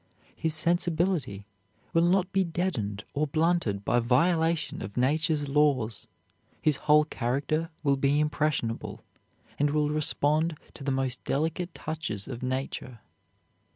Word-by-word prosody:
His 160 -1 -1
sensibility 170 - 0 0.5
will 165 - +4
not 185 +1 +2
be 190 0 +3
deadened 160 - -2
or 150 +2 0
blunted 155 - +1
by 120 - +3
violation 160 +7 +1
of 100 +3 -7
Nature's 145 +3 +1
laws. 135 -7 +1 0.5
His 150 -3 +2
whole 150 0 +4
character 145 +5 -1
will 140 -2 +3
be 140 +2 +2
impressionable, 150 -6 -1 0.6
and 145 0 +3
will 150 0 +1
respond 155 +1 +1 0.2
to - - -10
the 135 - 0
most 130 -1 -1
delicate 160 +5 -1
touches 150 -11 -4
of 125 -3 -6
Nature. 130 -2 -4
150 Hz, 125 wpm, -28 LUFS, 130-160 Hz, 0.6 s, will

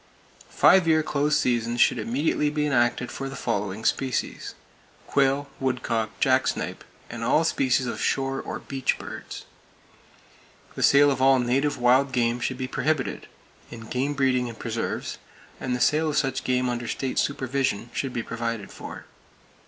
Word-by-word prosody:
Five 190 -3 +5
year 155 -1 +4
close 150 0 +1
seasons 120 -1 0
should 120 - +4
immediately 140 +6 0
be 150 0 -1
enacted 125 -3 +1
for 135 0 -5
the 135 - -7
following 100 -2 -3
species: 130 -2 -1 0.5
quail, 140 +1 +1
woodcock, 120 -4 -2
jacksnipe - - +1 0.2
and - - -6
all - - +3
species 130 0 +1
of 120 - -4
shore 135 0 0
or - - -5
"beach" 135 -2 -2
birds. - - -8 1.3
The - - -6
sale 145 +1 +6
of 130 -1 -2
all 135 0 +6
native 135 +4 +1
wild 130 +2 +3
game 120 -1 +1
should 130 +1 -2
be 130 0 -3
prohibited; 150 0 -1 0.4
and 115 -1 -10
game 135 +3 -1
breeding 130 -2 +1
in 115 - -7
preserves, 115 0 -4 0.4
and 125 -1 -2
the - - -3
sale 155 +4 +2
of 150 - -1
such 135 -3 0
game 125 0 +1
under 120 -1 -3
state 130 +2 -2
supervision, 130 -4 -1
should 135 - -2
be 120 -2 -3
provided 115 -3 -4
for. - - -9
130 Hz, 155 wpm, -25 LUFS, 120-140 Hz, 1.3 s, sale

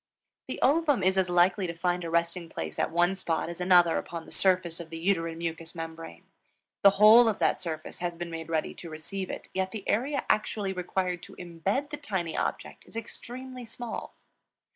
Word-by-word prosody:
The - - -5
ovum 290 - +3
is 190 +1 +3
as 190 -1 +2
likely 180 +2 +3
to 170 - -5
find 175 +1 0
a 165 - -4
resting 170 +1 0
place - - -5
at - - +1
one 175 +3 +2
spot 165 -3 -2
as 170 +1 -7
another 175 -2 +5
upon 170 -1 -7
the - - -13
surface 180 -3 +2
of 170 -1 -8
the 165 - -6
uterine 165 -2 0
mucous 165 0 -5
membrane. 165 - -7 0.6
The 200 - +9
whole 220 +3 +8
of 215 - -1
that - - +1
surface 160 -3 -5
has 175 -1 -2
been 170 0 -6
made 165 -1 -6
ready 160 -1 -1
to 170 - -9
receive 180 +5 -5
it; - - -6
yet 190 0 0
the 200 0 -7
area 275 +6 0
actually 210 -2 0
required 180 -1 -2
to - - -12
imbed 185 - -2
the 295 - -4
tiny 190 - -3
object - - -3
is - - -15
extremely 250 +3 -7
small. 235 0 -7
180 Hz, 195 wpm, -28 LUFS, 165-200 Hz, 0.6 s, The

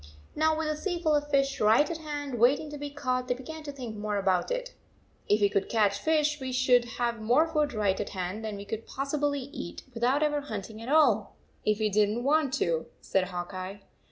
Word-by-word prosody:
Now 315 0 +2
with 320 -1 -1
a 305 - 0
sea 350 +2 -2
full 315 -2 +2
of 290 0 -1
fish 275 -1 +1
right 220 +7 +5
at 330 0 -4
hand, 290 -5 -4
waiting 280 +6 +3
to 295 - -6
be 290 0 -4
caught, 255 -3 -2
they 245 - +1
began 315 +5 -8
to 295 -1 -6
think 250 -6 -7
more 210 0 -2
about 190 -2 +1
it. - - -3 0.3
" - - -34
If 210 +1 +4
we 205 - +6
could 200 -1 -1
catch 205 -3 +2
fish, 300 -1 +1
we 260 -1 -3
should 250 -1 +4
have 235 -2 -1
more 245 +9 +4
food 305 -3 +1
right 205 -4 0
at 210 - -3
hand 185 +3 -4
than 215 -2 -4
we 200 - -8
could 220 +2 -5
pos 275 +1 -4
sibly 290 -2 0
eat, 175 - -7
without 250 +6 +2
ever 295 -1 +1
hunting 220 -4 -6
at 230 - -6
all, 245 -10 +3 0.3
if 215 -1 +3
we 215 -1 +1
didn 210 +1 +3
t 240 - -2
want 290 +1 +2
to," 165 -2 0
said 190 -1 0
Hawk 180 0 -5
Eye. 190 +2 -6
250 Hz, 235 wpm, -28 LUFS, 210-295 Hz, 0.3 s, we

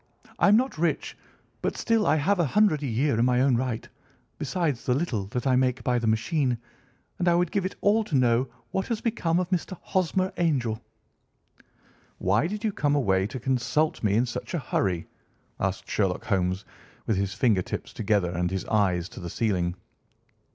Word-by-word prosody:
I'm 205 +2 +6
not 255 -8 -1
rich, 170 0 0 0.5
but - - -2
still 225 -2 +2
I 145 - +4
have 180 +6 +1
a - - +4
hundred 185 -1 +3
a 145 - -2
year 125 +1 +1
in - - +4
my 125 0 +3
own 135 -2 +4
right, 120 -2 -2 0.5
besides 150 -2 -1
the 125 - +1
little 125 - -1
that 125 +5 -4
I 130 -2 +3
make 130 -1 +1
by 125 +1 +1
the 115 - -1
machine, 120 +4 +1 0.6
and 180 - 0
I 170 - +5
would 175 -1 +1
give 195 -2 0
it - - -9
all 215 +2 +3
to 165 - -2
know 125 0 +3 0.2
what 190 - -1
has 230 -3 -1
become 180 -8 0
of 180 - -1
Mr. 185 0 -1
Hosmer 185 0 0
Angel." 130 -10 0 1.4
"Why 100 - +2
did 210 +4 -5
you 220 - +1
come 145 -4 +1
away 95 -8 +2
to 125 - -6
consult 135 +5 0
me 105 -2 +2
in 120 +3 +3
such 120 +8 -5
a - - 0
hurry?" 95 - -1 0.5
asked 95 0 -2
Sherlock 95 -4 0
Holmes, 95 -2 0 0.4
with 110 - +1
his 100 0 -1
finger 110 -3 +3
tips - - -6
together 100 -5 +1
and 90 0 -1
his 95 0 -3
eyes 95 -5 +1
to - - -10
the 85 -2 -6
ceiling. 90 -5 0
125 Hz, 190 wpm, -26 LUFS, 105-170 Hz, 1.4 s, I'm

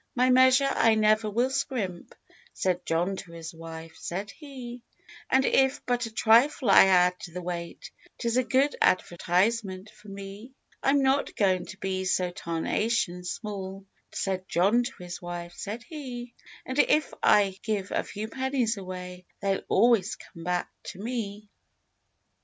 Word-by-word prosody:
"My 255 +1 +4
measure 260 +2 +6
I 225 -4 +4
never 215 0 +3
will 240 +5 +1
scrimp," 245 -10 -3 0.4
Said 180 -1 -1
John 175 +4 0
to 170 -3 -9
his 165 0 -8
wife, 165 0 -9
said 195 +4 -5
he— 255 -5 -9 0.5
"And 265 +1 +4
if 265 0 +2
but 245 -1 0
a - - -10
trifle 230 +2 +4
I - - +9
add 180 -1 +4
to 175 - -9
the 180 +2 -6
weight 170 -1 -6 0.3
'Tis 235 -1 -1
a 255 - +3
good 270 +3 +2
advertisement 185 +3 +1
for 210 - -18
me." 200 +5 -9 0.3
"I'm 275 0 +3
not 270 +1 +1
going 185 -3 +1
to 190 - -9
be 190 -1 -2
so 180 -1 +1
tarnation 180 +3 -1
small," 195 0 -6 0.3
Said 190 -1 -3
John 200 +8 +3
to 245 -6 -6
his 175 0 -7
wife, 175 0 -6
said 220 +3 -6
he— 245 -5 -7 0.3
"And 260 +2 -3
if 300 0 +3
I 195 -2 +4
give 205 -3 -2
a - - 0
few 215 +1 -6
pennies 260 -2 -1
away 180 -1 -8
They'll 195 -1 0
always 230 -4 +3
come 165 -3 -13
back 180 +1 -1
to 190 - -7
me." 210 -2 -5
205 Hz, 155 wpm, -27 LUFS, 180-245 Hz, 0.5 s, I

